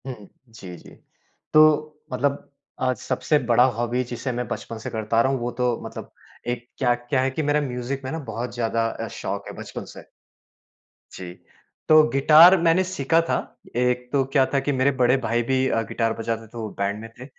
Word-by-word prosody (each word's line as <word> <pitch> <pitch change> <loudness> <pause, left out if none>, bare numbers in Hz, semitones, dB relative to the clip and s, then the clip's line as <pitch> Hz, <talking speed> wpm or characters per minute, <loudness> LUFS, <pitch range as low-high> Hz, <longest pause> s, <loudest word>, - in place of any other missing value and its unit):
हुँ, 115 -6 -8 0.2
जी, 95 -6 -10
जी, - - -15 0.6
तो 155 0 +4
मतलब 140 +2 -1 0.3
आज 130 0 +1
सबसे 130 +4 0
बड़ा 120 0 +4
हॉबी 120 +2 -1
जिसे 125 +2 -3
मैं 125 -1 -3
बचपन 115 - -6
से - - -6
करता 110 +1 0
रहा 130 - +2
हूँ 135 - -1
वो 120 +1 -2
तो 125 -2 +1
मतलब - - -8 0.4
एक 120 0 -3
क्या 125 -3 +2
क्या 120 +2 -1
हैं 135 +1 0
कि 155 - -2
मेरा 145 +1 +1
म्यूज़िक 130 0 -4
में 130 - -4
ना 160 - -3
बहुत 120 +2 -5
ज़्यादा 115 -1 0
अ, - - -6
शौक - - -5
है - - -7
बचपन - - -7
से। - - -12 1.1
जी, 90 -1 -8 0.6
तो 155 0 +8
गिटार 155 +7 +7
मैंने 170 +2 +3
सीखा 165 -3 +1
था। - - +2 0.4
एक 125 0 0
तो 140 -2 +2
क्या 135 -3 +5
था 140 - +3
कि 145 - -1
मेरे 130 +1 +2
बड़े 125 +2 +4
भाई 120 +2 +1
भी 130 +2 +1
अ, 115 - +1
गिटार 115 -1 -1
बजाते 115 0 -3
थे 120 - -12
वो 110 -2 -4
बैंड 100 +1 -1
में 115 - -9
थे। 125 - -8
125 Hz, 200 wpm, -23 LUFS, 115-140 Hz, 1.1 s, तो